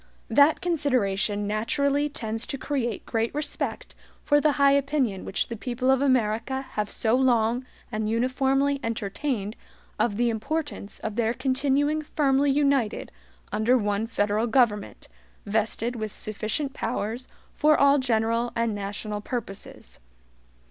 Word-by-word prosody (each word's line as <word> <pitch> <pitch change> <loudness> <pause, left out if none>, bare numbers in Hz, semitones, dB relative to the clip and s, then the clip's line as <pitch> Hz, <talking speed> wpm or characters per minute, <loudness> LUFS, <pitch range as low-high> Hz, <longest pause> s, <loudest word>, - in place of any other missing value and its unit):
That 290 +2 +5
consideration 225 - 0
naturally 280 +8 0
tends 225 -4 -4
to 275 - -3
create 255 -5 -2
great 225 0 -1
respect 300 0 -3 0.3
for 290 -1 +3
the 300 -1 +3
high 280 -1 +4
opinion 275 -8 +1
which - - -1
the 230 - -5
people 250 +3 0
of 265 0 +3
America 255 0 +1
have 210 -1 -2
so 225 +1 +1
long 245 -1 +2 0.2
and 215 -1 -1
uniformly 270 +4 +1
entertained 225 0 -2 0.4
of 205 -4 +1
the 240 0 +2
importance 275 -1 -4
of 220 0 -4
their 230 0 +1
continuing 275 +3 +1
firmly 285 -2 +2
united 275 -5 +1 0.4
under 235 +4 +3
one 205 0 0
federal 215 0 0
government, 225 -4 +1 0.4
vested 220 +3 -1
with 215 -3 -5
sufficient 215 +7 -3
powers 230 0 -3 0.3
for 305 0 +4
all 280 0 +5
general 230 -1 +1
and 230 -1 0
national 205 +1 -4
purposes. 210 -4 -6
240 Hz, 130 wpm, -26 LUFS, 215-275 Hz, 0.4 s, That